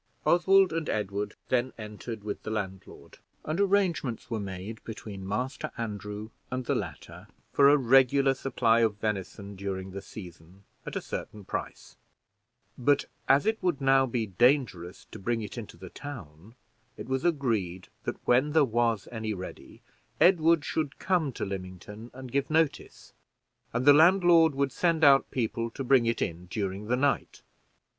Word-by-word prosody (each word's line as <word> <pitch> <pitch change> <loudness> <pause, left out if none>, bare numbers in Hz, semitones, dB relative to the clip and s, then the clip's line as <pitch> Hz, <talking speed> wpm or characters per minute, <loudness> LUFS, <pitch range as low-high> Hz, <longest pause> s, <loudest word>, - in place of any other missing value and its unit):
Oswald 190 +1 +4
and 165 -2 -2
Edward 105 -1 -2
then 130 0 +1
entered 105 0 -7
with 105 -1 -5
the - - -6
landlord, 95 -3 -6 0.3
and 155 +4 -2
arrangements 185 - 0
were 115 - -1
made 100 +2 -7
between 100 -4 -8
Master 130 +8 -3
Andrew 105 -1 -5 0.2
and 125 0 -3
the - - +1
latter - - -6 0.3
for 140 -1 +6
a 145 - +6
regular 135 +1 +4
supply 120 -3 +1
of 110 -3 +2
venison 100 -1 -4
during 95 -1 -5
the 100 +1 -6
season, 90 -1 -12 0.2
at - - -5
a - - -1
certain 105 -2 -7
price; - - -6 0.8
but 145 +3 +2 0.2
as 140 +6 +5
it 220 +1 0
would 175 -7 0
now 135 -1 +4
be 120 -2 -1
dangerous 110 - +1
to - - -9
bring 115 +3 -1
it 105 - -7
into 110 -7 -8
the 95 +1 -11
town, 110 - -10 0.4
it - - -8
was 130 0 -1
agreed 110 - -1 0.2
that - - -3
when 130 +5 +3
there 160 -3 +5
was 115 -3 0
any 110 -2 -3
ready, 95 0 -10 0.4
Edward 165 -3 +4
should 155 -2 -2
come 175 -7 0
to - - -4
Lymington 95 +3 -7
and 130 -1 -10
give 140 0 0
notice, 160 -1 -1 0.6
and 125 +2 -1
the 145 - +9
landlord 165 -1 +5
would 140 -1 0
send 165 0 +1
out 140 -2 +6
people 115 -1 -2
to 135 +4 -6
bring 130 -2 +4
it 115 0 +1
in 85 +2 -5
during 100 0 -3
the 125 +2 +1
night. 140 +1 -1
120 Hz, 160 wpm, -28 LUFS, 105-140 Hz, 0.8 s, the